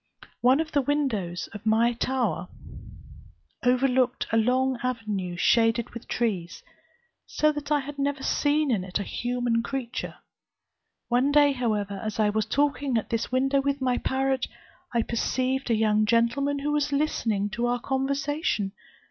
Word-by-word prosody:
One 255 +4 +4
of 320 -1 -2
the 285 - +2
windows 240 -12 -1
of 205 - -8
my 225 +2 +3
tower 255 +1 -1 1.2
overlooked 255 0 +2
a - - +2
long 255 +2 +2
avenue 215 -8 -3
shaded 230 +4 +3
with 235 - -9
trees, 195 -8 -2 0.6
so 305 0 +2
that 295 -1 -6
I 295 -1 +3
had 285 +1 -8
never 280 -1 -1
seen 295 -1 +1
in 205 -6 +1
it 185 -1 -2
a 205 - -3
human 245 +1 -1
creature. 250 -1 -4 0.9
One 250 +4 +2
day, 290 0 +5
however, 210 -6 -1
as 215 0 -4
I 210 -1 +3
was 215 0 -1
talking 280 -1 +1
at 220 - -3
this 230 +1 -1
window 270 +2 +2
with 280 0 -1
my 255 -2 +1
parrot, 265 -1 0 0.4
I 235 -1 +1
perceived 255 +3 -1
a 230 - +3
young 215 -1 +2
gentleman 235 +6 +2
who 285 +1 -2
was 295 -1 0
listening 225 -8 0
to 235 +3 -1
our 245 0 0
conversation. 275 -4 -1
250 Hz, 155 wpm, -26 LUFS, 225-275 Hz, 1.2 s, day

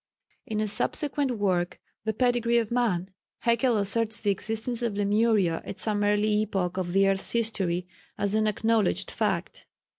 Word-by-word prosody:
In 215 -1 -2
a 215 - 0
subsequent 270 +4 0
work, 180 -4 0 0.3
"The 220 - 0
Pedigree 235 0 +2
of 230 -2 0
Man," 210 -7 0 0.3
Haeckel 235 0 +2
asserts 220 +2 0
the 205 -3 +1
existence 225 +4 -2
of 230 -4 -1
Lemuria 205 -4 +2
at - - -8
some 210 -2 -1
early 210 +1 +2
epoch 190 -4 -2
of 175 -2 -2
the 195 0 +4
earth's 195 0 +1
history 190 -6 -1 0.3
as 200 0 0
an 215 0 +2
acknowledged 220 +1 +1
fact. - - -2
215 Hz, 155 wpm, -27 LUFS, 195-230 Hz, 0.3 s, the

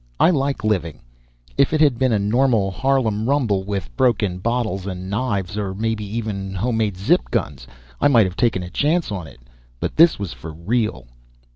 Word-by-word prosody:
I 175 - +5
like 140 -4 -1
living. 90 -8 -1 0.6
If 140 - +4
it 155 - +2
had 145 -6 +3
been 130 -2 +2
a 110 - +3
normal 105 -1 +2
Harlem 115 -2 0
rumble 115 -9 +1
with 95 -12 -4
broken 105 -7 +1
bottles 110 -3 -2
and 95 0 -5
knives, 100 -4 -2
or 95 -2 -3
maybe 110 +1 -2
even 100 -2 -4
home 115 +5 -1
made 105 -4 0
zip 60 -10 +1
guns 65 -2 -3 0.3
I - - +4
might 120 -7 +5
have 90 -1 -4
taken 115 -6 +1
a 90 - -8
chance 155 -1 +1
on 90 -5 -4
it, 65 -4 -15 0.4
but - - -3
this 165 +1 +6
was 100 -5 -5
for 80 -1 -9
real. 90 - -1
105 Hz, 185 wpm, -21 LUFS, 95-125 Hz, 0.6 s, this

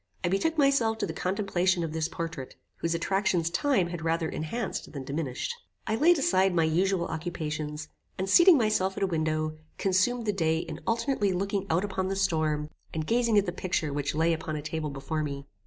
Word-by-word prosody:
I 175 - +2
betook 320 - +1
myself 275 -6 +3
to 215 - -1
the - - -5
contemplation 185 -2 0
of 160 -1 -3
this 160 0 0
portrait, 165 -6 -6 0.2
whose 165 0 -1
attractions 175 -1 +1
time 210 -5 +2
had 175 -2 -5
rather 165 0 0
enhanced 175 +8 -4
than 140 -3 -5
diminished. 140 - -3 0.3
I 220 - -1
laid 330 +8 +5
aside 190 -8 +3
my 165 - +4
usual 175 +3 +1
occupations, 155 -2 -4 0.3
and 190 - -2
seating 345 - +7
myself 215 -5 +1
at - - 0
a - - +5
window, 155 -3 -1 0.2
consumed 200 +6 +1
the 210 - +1
day 160 -4 +1
in 165 -1 -5
alternately 230 -3 +1
looking 195 +1 -1
out 170 +5 +2
upon 190 -2 -2
the 195 - -1
storm, 155 -6 0 0.2
and 155 -1 -3
gazing 235 +2 +2
at 200 - +4
the 175 - -2
picture 170 -4 -2
which 145 +1 -2
lay 165 +2 +3
upon 160 -1 -4
a 150 - -4
table 155 0 -3
before 140 +3 -3
me. 140 -2 -4
175 Hz, 195 wpm, -28 LUFS, 155-200 Hz, 0.3 s, seating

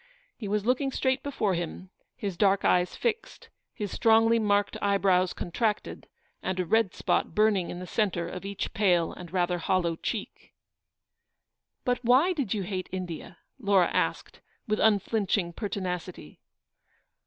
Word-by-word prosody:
He 215 - -6
was 210 +1 -1
looking 260 +3 +1
straight 260 0 0
before 220 -8 -1
him, 175 +2 -5 0.2
his 200 -7 -4
dark 195 +1 +2
eyes 180 0 +2
fixed, 455 -1 -3 0.2
his 205 -5 -5
strongly 225 0 +4
marked 205 -2 +1
eyebrows 195 -3 +3
con 175 - -6
tracted, 215 +2 -1 0.4
and 185 0 -2
a 180 - 0
red 220 +2 +2
spot - - 0
burning 210 -4 +3
in - - -5
the 180 - -6
centre 180 -4 -1
of 180 +2 -7
each 200 0 -4
pale 180 -5 +2
and 175 -3 -10
rather 180 -1 0
hollow 170 -1 +1
cheek. - - -6 1.3
"But 250 0 0
why 260 +10 +4
did 275 - -3
you 205 -3 0
hate 185 -1 -4
India?'' 175 -2 -6 0.2
Laura 200 -6 +3
asked, - - -1 0.3
with 215 0 0
unflinching 200 -4 +1
pertinacity. 180 - -5
200 Hz, 145 wpm, -28 LUFS, 180-220 Hz, 1.3 s, strongly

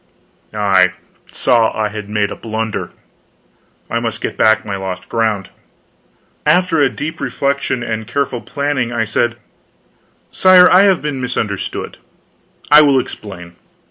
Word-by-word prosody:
I 95 -4 +2 0.4
saw 115 -2 +2
I 105 -1 0
had 105 -1 -7
made 105 -1 -1
a - - -5
blunder. 110 -1 -4 1.0
I - - -1
must - - -4
get - - -4
back 110 0 +3
my 100 -2 -3
lost 95 -1 -6
ground. 110 -4 -1 0.9
After 180 -4 +2
a 140 - +4
deep 150 +4 -6
reflection 140 -3 -1
and 110 -2 -4
careful 130 -1 -2
planning, 140 0 -2
I 115 -2 -1
said: 120 +2 0 1.0
"Sire, 185 -1 +6
I 185 +2 +6
have 190 -5 +2
been 145 -3 -3
misunderstood. 110 -5 -4 0.7
I 150 +1 +9
will 140 -3 +4
explain. 90 -8 -8
115 Hz, 135 wpm, -16 LUFS, 105-140 Hz, 1.0 s, I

